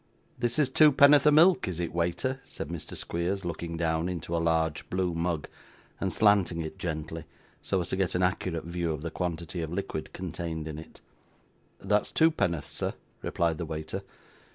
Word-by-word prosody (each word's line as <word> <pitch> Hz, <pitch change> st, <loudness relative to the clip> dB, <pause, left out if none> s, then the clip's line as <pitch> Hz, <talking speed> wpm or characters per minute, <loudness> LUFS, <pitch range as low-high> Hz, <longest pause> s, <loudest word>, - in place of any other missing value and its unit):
'This 120 Hz, -1 st, 0 dB
is 150 Hz, -3 st, +4 dB
twopenn'orth 145 Hz, 0 st, +7 dB
of 150 Hz, -, +7 dB
milk, 170 Hz, -, +6 dB
is 90 Hz, -2 st, -3 dB
it, 85 Hz, -2 st, -2 dB
waiter?' 85 Hz, +11 st, -1 dB
said -, -, -7 dB
Mr. 85 Hz, -2 st, -6 dB
Squeers, 90 Hz, +3 st, -2 dB
looking 85 Hz, -1 st, -4 dB
down 80 Hz, +1 st, 0 dB
into 85 Hz, -1 st, -3 dB
a 85 Hz, -, +1 dB
large 80 Hz, -1 st, 0 dB
blue 90 Hz, -1 st, 0 dB
mug, 85 Hz, -1 st, -1 dB, 0.5 s
and 95 Hz, -, -1 dB
slanting 100 Hz, -5 st, +3 dB
it 80 Hz, -, -7 dB
gently, 80 Hz, -1 st, -4 dB, 0.4 s
so 95 Hz, -, 0 dB
as 85 Hz, -, -5 dB
to -, -, 0 dB
get 95 Hz, -2 st, 0 dB
an 90 Hz, -, +2 dB
accurate 90 Hz, -2 st, 0 dB
view 85 Hz, -1 st, -2 dB
of 75 Hz, 0 st, -6 dB
the 85 Hz, -, -3 dB
quantity 85 Hz, 0 st, -3 dB
of 80 Hz, -1 st, -4 dB
liquid 85 Hz, -4 st, -4 dB
contained 85 Hz, -3 st, -5 dB
in 75 Hz, -1 st, -5 dB
it. 80 Hz, -, -13 dB, 0.8 s
'That's 105 Hz, +2 st, +1 dB
twopenn'orth, 105 Hz, -, +2 dB
sir,' -, -, -3 dB, 0.3 s
replied 85 Hz, -2 st, 0 dB
the 85 Hz, -, -2 dB
waiter. 80 Hz, +4 st, -4 dB
85 Hz, 175 wpm, -29 LUFS, 80-95 Hz, 0.8 s, twopenn'orth